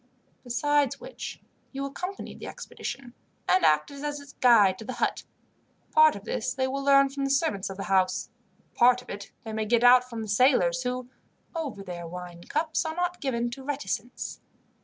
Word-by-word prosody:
Besides 285 +2 +1
which, - - -7 0.3
you 275 0 -4
accompanied 360 +8 -6
the - - -7
expedition, 245 -3 -7 0.3
and 370 - +4
acted 155 - +2
as 295 0 -3
its 280 0 -13
guide 210 -7 +5
to - - -7
the 255 - -5
hut. 240 - -1 0.7
Part 310 0 +6
of 200 - -9
this 250 +2 -2
they 260 0 +1
will 275 +1 -3
learn 275 0 +5
from 275 0 -4
the 275 - 0
servants 270 - +1
of 195 - -7
the 195 - -4
house, 185 -1 +1 0.4
part 250 0 +4
of - - -10
it 200 0 -8
they 220 -1 -6
may 220 0 -1
get 235 +1 +3
out 250 +1 +7
from 230 -2 -5
the - - -6
sailors, 210 -3 +3
who, 250 0 -3 0.4
over 275 -12 -4
their 175 -2 -6
wine 175 0 -8
cups, 315 +2 0
are 320 -1 -4
not 355 0 -2
given 240 -4 -1
to 265 +2 -8
reticence. 260 -4 -4
250 Hz, 185 wpm, -27 LUFS, 210-280 Hz, 0.7 s, out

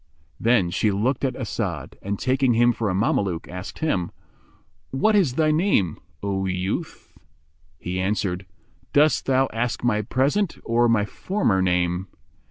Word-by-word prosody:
Then 115 -7 +3
she 110 - +1
looked 115 +8 0
at 130 - 0
As'ad 100 - -4
and, 100 +1 -3
taking 130 0 +2
him 120 +1 +4
for 110 -2 -2
a 90 - -1
Mameluke, 95 -4 0
asked 90 +1 -7
him, 95 - 0 0.8
"What 215 +12 +2
is 165 -11 +3
thy 155 0 +3
name, 155 - +1 0.2
O 95 -1 -1
youth?" 95 - -4 0.6
He 90 +3 -4
answered, 95 -1 -1 0.5
"Dost 150 +2 +3
thou 135 0 +3
ask 120 +2 -2
my 105 -3 +2
present 140 - 0
or 120 +1 +2
my 110 -3 +3
former 115 - 0
name?" 90 0 0
110 Hz, 145 wpm, -24 LUFS, 95-130 Hz, 0.8 s, him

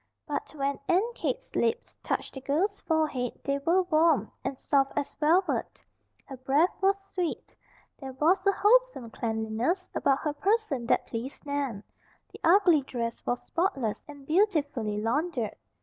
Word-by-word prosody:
But 295 +1 -4
when 280 -1 -1
Aunt 405 +7 +2
Kate's - - -4
lips 465 +1 0
touched - - -3
the 265 - -7
girl's 355 +10 0
forehead 305 -7 -1
they 280 0 0
were 340 +6 +2
Warm, 315 - +2
and 270 - -3
soft 275 -1 +1
as 285 - -2
velvet. 335 +5 +1 0.4
Her 270 - -9
breath 275 +7 +2
was 390 +1 +3
sweet. 360 -3 -3 0.4
There 265 -2 -7
was 335 +8 +2
a - - +7
wholesome 425 - +2
cleanliness 225 - -2
about 275 -1 +2
her 300 -2 -1
person 335 - 0
that - - +2
pleased 245 +6 -6
Nan. 280 -8 -2 0.5
The - - -11
ugly 345 -3 +5
dress 235 -3 -4
was 245 - -1
spotless 300 - -1
and 285 -2 -12
beautifully 290 - +1
laundered. 245 +1 -1
290 Hz, 150 wpm, -28 LUFS, 260-365 Hz, 0.5 s, a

